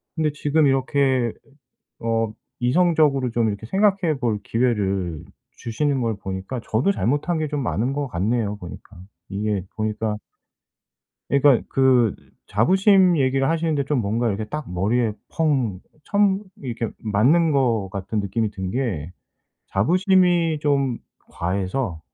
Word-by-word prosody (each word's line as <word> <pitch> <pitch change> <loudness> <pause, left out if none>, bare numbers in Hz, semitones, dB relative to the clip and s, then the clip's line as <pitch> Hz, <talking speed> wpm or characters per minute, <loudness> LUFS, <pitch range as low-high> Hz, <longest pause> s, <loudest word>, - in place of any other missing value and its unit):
근데 155 -2 +1
지금 150 0 +2
이렇게 130 -2 +1 0.7
어 115 -1 0 0.3
이성적으로 145 -2 +3
좀 115 -1 +1
이렇게 105 +2 -4
생각해 190 - +2
볼 115 -4 0
기회를 100 -9 -1 0.3
주시는 135 +4 -1
걸 115 -3 -1
보니까 95 +6 -4
저도 120 - +1
잘못한 145 - 0
게 155 -1 -1
좀 145 -2 -2
많은 120 +2 -1
것 145 0 -2
같네요 105 +3 -1
보니까. 90 +1 -11 0.3
이게 105 -1 -2
보니까 110 0 -2 1.1
그러니까 140 -2 +4
그 130 -5 +3 0.3
자부심 185 - +4
얘기를 135 +1 +2
하시는데 160 -3 0
좀 140 -3 0
뭔가 115 +3 0
이렇게 105 0 -2
딱 150 -1 -6
머리에 110 +5 +1 0.2
펑 130 - 0 0.2
처음 200 +1 +2 0.2
이렇게 115 -3 -4
맞는 130 +11 +3
거 120 -8 +1
같은 100 +3 -3
느낌이 105 +2 -1
든 95 -2 -5
게 100 - -2 0.6
자부심이 175 - +3
좀 140 -5 +1 0.3
과해서 95 +1 -2
125 Hz, 275 characters per minute, -22 LUFS, 105-150 Hz, 1.1 s, 그러니까